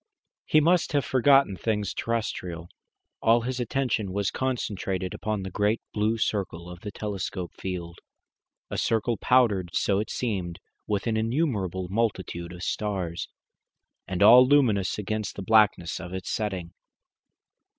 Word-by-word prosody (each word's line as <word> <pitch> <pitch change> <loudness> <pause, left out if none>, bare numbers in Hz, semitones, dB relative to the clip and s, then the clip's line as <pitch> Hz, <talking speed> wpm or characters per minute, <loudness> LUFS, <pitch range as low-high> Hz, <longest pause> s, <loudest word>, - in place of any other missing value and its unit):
He 155 - +5
must 170 +2 +2
have 145 -2 +2
forgotten 135 -4 +4
things 105 -1 -1
terrestrial. 90 -7 -3 0.5
All 115 +1 +4
his 125 +2 -3
attention 120 -5 -1
was 100 +1 -1
concentrated 100 -7 -2
upon 105 -2 -3
the 95 - -6
great 105 +4 +1
blue 110 +2 +1
circle 90 -6 -2
of 90 - -10
the 105 - -6
telescope 95 -3 -4
field 85 -2 -6 0.7
a - - -2
circle 115 +1 +1
powdered, 105 -8 +2
so 100 -1 +2
it 110 - -3
seemed, 95 -8 -3 0.3
with 105 -2 -1
an 115 -2 0
innumerable 110 - -1
multitude 95 -4 -2
of 90 0 -9
stars, 95 -5 -3 0.8
and 95 0 0
all 120 +4 +9
luminous 120 -9 +3
against 110 +1 -3
the 100 - -5
blackness 105 -5 +3
of 90 0 -7
its 95 -2 -5
setting. 95 -6 -3
105 Hz, 140 wpm, -26 LUFS, 95-115 Hz, 0.8 s, all